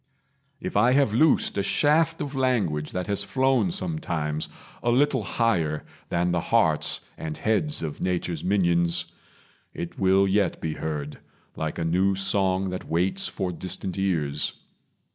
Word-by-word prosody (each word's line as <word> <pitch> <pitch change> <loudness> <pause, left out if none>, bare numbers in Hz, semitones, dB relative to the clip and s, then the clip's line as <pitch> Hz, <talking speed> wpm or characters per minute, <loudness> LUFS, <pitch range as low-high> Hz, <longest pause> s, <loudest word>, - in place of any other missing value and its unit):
If - - -5
I 120 +5 +4
have 135 -6 +3
loosed 145 -5 +3
A - - +3
shaft 155 +10 +2
of 145 -1 -4
language 110 - 0
that 90 0 -3
has 100 +1 +2
flown 130 - +2
sometimes 85 - -2 0.3
A 120 - 0
little 130 +1 +3
higher 90 -7 0 0.2
than 85 +1 +1
the 85 -1 +1
hearts 80 -7 +1 0.2
and 80 -1 -4
heads 110 - 0
Of 75 -2 -5
nature's 90 -3 -2
minions, 85 -2 +2 0.7
it 85 - -6
will 95 +1 +4
yet 95 -2 +1
be 80 - -3
heard, 75 -2 -5 0.4
Like 80 -1 -3
a 85 - -2
new 95 +4 +2
song 95 -1 +1
that 90 - -6
waits 95 - +1
for 95 - -3
distant 90 +1 -4
ears. 75 -7 0
95 Hz, 145 wpm, -25 LUFS, 85-120 Hz, 0.7 s, I